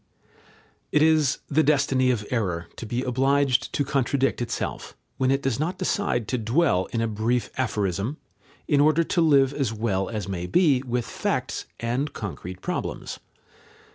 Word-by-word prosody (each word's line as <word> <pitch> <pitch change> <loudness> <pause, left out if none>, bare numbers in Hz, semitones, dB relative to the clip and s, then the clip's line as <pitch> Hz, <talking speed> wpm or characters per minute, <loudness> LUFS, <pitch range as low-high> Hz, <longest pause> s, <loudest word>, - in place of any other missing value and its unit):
It 150 - +4
is 155 -3 +3
the 155 +2 +3
destiny 135 -4 +3
of 115 -4 0
error 90 -8 -1
to 115 - -6
be 120 +4 -2
obliged 135 +1 +2
to 145 - 0
contradict 135 -1 0
itself, 120 -1 -4 0.2
when 130 -1 +1
it 135 +1 +1
does 135 -2 0
not 175 +5 -1
decide 150 - 0
to 125 - 0
dwell 115 - +2
in 115 - -2
a 115 - +1
brief 110 +2 -1
aphorism, 105 - -1 0.5
in 145 -2 +4
order 155 +3 +4
to 170 - 0
live 140 -4 +4
as 135 -6 -1
well 105 -4 -1
as 105 -4 -4
may 90 -2 -3
be 140 - +3
with 120 -1 -1
facts - - -2
and 125 +6 -1
concrete 95 -3 -6
problems. - - -4
125 Hz, 160 wpm, -25 LUFS, 110-140 Hz, 0.5 s, It